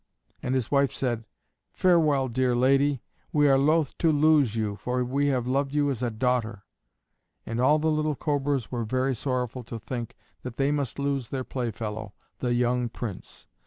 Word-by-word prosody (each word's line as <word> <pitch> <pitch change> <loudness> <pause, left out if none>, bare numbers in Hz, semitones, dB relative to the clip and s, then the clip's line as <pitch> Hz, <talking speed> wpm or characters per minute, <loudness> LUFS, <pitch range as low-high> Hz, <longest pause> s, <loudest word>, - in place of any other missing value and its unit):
And 130 - -1
his 130 -4 -1
wife 140 -1 +3
said, 120 -4 -2 0.5
"Farewell, 155 -7 +3
dear 125 0 +1
lady, 135 +1 +3 0.3
we 145 -1 +4
are 135 -1 +5
loath 155 +1 +2
to 165 - +4
lose 145 -6 +4
you, 105 -2 -1
for 125 +2 -1
we 140 +3 0
have 130 -4 +1
loved 135 +2 0
you 145 -1 +2
as 125 -3 -4
a 120 - 0
daughter." 115 -2 -1 0.8
And 115 +1 -2
all 145 +4 +5
the 160 +1 +1
little 155 -1 0
Cobras 140 -3 -1
were 120 -2 -2
very 130 +4 0
sorrowful 125 0 -2
to 115 - -6
think 115 +1 -6 0.2
that 125 -2 -7
they 140 +2 +1
must 140 -5 -2
lose 140 -3 -1
their 130 -1 -3
playfellow, 110 -4 -4 0.2
the 120 -1 0
young 125 0 +1
Prince. 110 -4 -7
130 Hz, 175 wpm, -26 LUFS, 120-140 Hz, 0.8 s, are